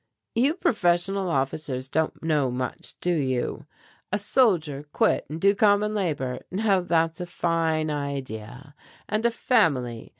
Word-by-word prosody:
"You 265 +7 +2
professional 195 - +1
officers 135 -2 -2
don't 160 +4 -1
know 150 -5 +1
much, 125 +1 -4
do 180 - +1
you? 130 -6 -2 0.4
A 205 - +2
soldier 175 - +1
quit - - +1
and 155 +2 -5
do 200 +3 +4
common 205 +1 +3
labor, 150 -11 -2
now 195 -1 +2
that's 165 -1 0
a 180 - -4
fine 165 -3 0
idea. 140 -2 -5 0.3
And 215 +3 +1
a - - +2
family! 145 - +1
165 Hz, 135 wpm, -25 LUFS, 140-200 Hz, 0.4 s, do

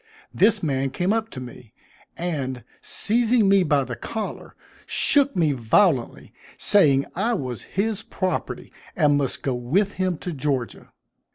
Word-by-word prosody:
This 205 0 +3
man 135 -3 0
came 180 +9 0
up 225 0 -1
to 130 - -8
me, 125 -2 -11 0.4
and, 135 -8 -3 0.2
seizing 230 0 +1
me 195 0 +5
by 145 -5 +2
the 120 -1 -6
collar, 220 - -6 0.3
shook 280 -1 +2
me 165 -5 +2
violently, 130 - +1 0.2
saying 140 -9 +4
I 225 +6 0
was 125 - -4 0.2
his 215 +1 0
property, 185 -5 -4 0.2
and 150 -6 +3
must 140 -2 -2
go 135 - 0
with 150 +12 0
him 185 -3 0
to 180 - -5
Georgia. 135 -4 -3
165 Hz, 145 wpm, -23 LUFS, 135-205 Hz, 0.4 s, me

